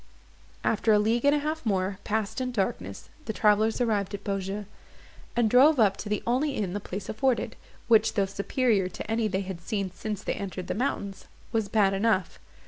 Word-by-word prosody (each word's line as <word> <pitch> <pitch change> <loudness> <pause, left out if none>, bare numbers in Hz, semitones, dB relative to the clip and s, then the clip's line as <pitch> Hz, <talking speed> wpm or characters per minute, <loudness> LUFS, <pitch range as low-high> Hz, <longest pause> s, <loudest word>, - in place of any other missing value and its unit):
After 220 0 +2
a 210 - +6
league 225 +4 +1
and 285 +1 +5
a - - +2
half 310 +2 -2
more, 195 -3 0
passed 220 +2 -2
in 255 0 -2
darkness, 100 - -3 0.2
the 220 - -3
travellers 215 +2 +3
arrived 210 -4 0
at - - -9
Beaujeu, 195 +1 -3 0.7
and 235 -2 +3
drove 265 +6 +6
up 200 -3 +4
to 210 - -6
the 210 - -1
only 265 +4 +1
inn 195 -4 -2
the 205 - -2
place 190 0 -6
afforded; 240 +1 0 0.3
which, 225 -2 +4
though 200 -3 +3
superior 200 0 0
to - - -7
any 225 -1 +1
they 190 -1 -1
had 190 -3 -6
seen 195 -1 -2
since 210 +2 -5
they - - -1
entered 190 -2 -5
the - - -2
mountains, 200 -4 -3 0.2
was 220 -3 0
bad 205 -3 +3
enough. 195 -2 0
210 Hz, 195 wpm, -27 LUFS, 195-230 Hz, 0.7 s, a